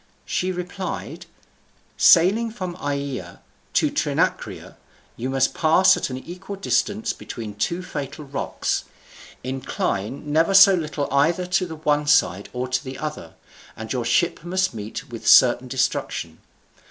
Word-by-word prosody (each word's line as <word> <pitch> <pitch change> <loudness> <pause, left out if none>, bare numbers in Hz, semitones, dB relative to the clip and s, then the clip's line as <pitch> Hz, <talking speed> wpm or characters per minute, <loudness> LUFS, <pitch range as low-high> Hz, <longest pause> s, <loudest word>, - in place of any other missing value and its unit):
She 185 +1 -1
replied: 180 +1 -6 0.7
"Sailing 195 +7 +5
from 185 -6 -6
Aeaea 140 - -4 0.4
to - - +2
Trinacria, - - -1 0.4
you 125 +3 -4
must 135 0 +1
pass 185 +4 +5
at - - -3
an 130 - -4
equal 180 +8 -8
distance 205 +2 0
between 110 -3 -7
two 170 - -2
fatal 145 -2 -6
rocks. 140 0 -2 0.6
Incline 130 0 -3
never 165 +5 +3
so 195 0 +9
little 150 -5 -2
either 165 +6 +2
to 180 0 0
the 160 - -7
one 150 -1 0
side 100 -10 +2
or 125 +1 -3
the 130 +1 -3
other, 150 - -6 0.4
and 110 +2 -5
your 125 -2 -1
ship 165 +10 +1
must 185 0 0
meet 110 +5 -7
with 115 -2 -7
certain 125 0 +6
destruction. 130 +1 -2
150 Hz, 135 wpm, -23 LUFS, 130-180 Hz, 0.7 s, so